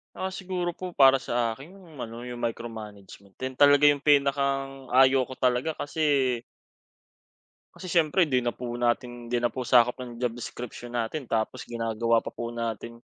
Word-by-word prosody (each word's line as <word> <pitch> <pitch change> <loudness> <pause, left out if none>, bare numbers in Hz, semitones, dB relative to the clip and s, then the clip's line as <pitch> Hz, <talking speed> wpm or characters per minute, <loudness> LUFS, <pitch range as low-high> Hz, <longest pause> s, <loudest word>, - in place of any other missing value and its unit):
Ah, 190 0 -3
siguro 180 -2 -4
po 185 -1 -6
para 135 -2 +6
sa 120 -3 -1
akin 145 +7 -13
yung 180 -6 -16
ano 115 +1 -9
yung 125 0 -7
micro-management 110 -4 -7
din 130 0 -4
talaga 145 +1 +6
yung 145 -1 +1
pinakang 140 -2 +1
ayaw 130 0 +5
ko 130 - -11
talaga 130 +4 0
kasi 140 -6 0 1.3
kasi 185 - -9
syempre, 165 0 +3
di 125 -2 +1
na 120 - 0
po 125 - -7
natin 120 0 -1
hindi 120 0 0
na 120 - +2
po 130 +1 -5
sakop 125 -1 +4
ng 120 -2 -8
job 120 -2 -1
description 120 0 -8
natin 120 +5 -2
tapos 110 -2 -2
ginagawa 115 0 0
pa - - -7
po 120 0 -6
natin. 115 0 -5
125 Hz, 170 wpm, -27 LUFS, 120-145 Hz, 1.3 s, para